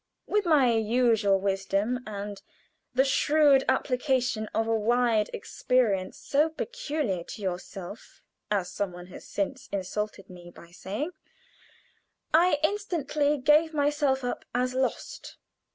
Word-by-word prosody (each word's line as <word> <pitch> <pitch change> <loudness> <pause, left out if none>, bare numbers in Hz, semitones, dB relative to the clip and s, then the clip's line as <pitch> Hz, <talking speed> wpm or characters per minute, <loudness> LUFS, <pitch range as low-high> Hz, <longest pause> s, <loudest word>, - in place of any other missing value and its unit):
With 415 -3 0
my 280 -7 +5
usual 225 -3 +3
wisdom, 195 +4 0
and 205 -1 -6 0.5
"the 265 +1 +4
shrewd 285 0 +4
application 255 -4 0
of 225 - -1
a 225 - +1
wide 225 -1 +2
experience 210 -7 0
so 295 +3 +1
peculiar 305 - -3
to 215 - -9
yourself," 185 +2 -6 0.3
as 200 -4 0
some 200 -3 -3
one 175 0 -9
has - - -11
since 205 +7 -3
insulted 200 +1 -4
me 175 -1 -12
by 170 0 -15
saying, 205 - -4 1.2
I 335 0 +5
instantly 310 -6 0
gave 305 +4 +3
myself 290 -2 +1
up 245 - -3
as 250 +1 +1
lost. 260 0 -3
245 Hz, 120 wpm, -27 LUFS, 200-290 Hz, 1.2 s, my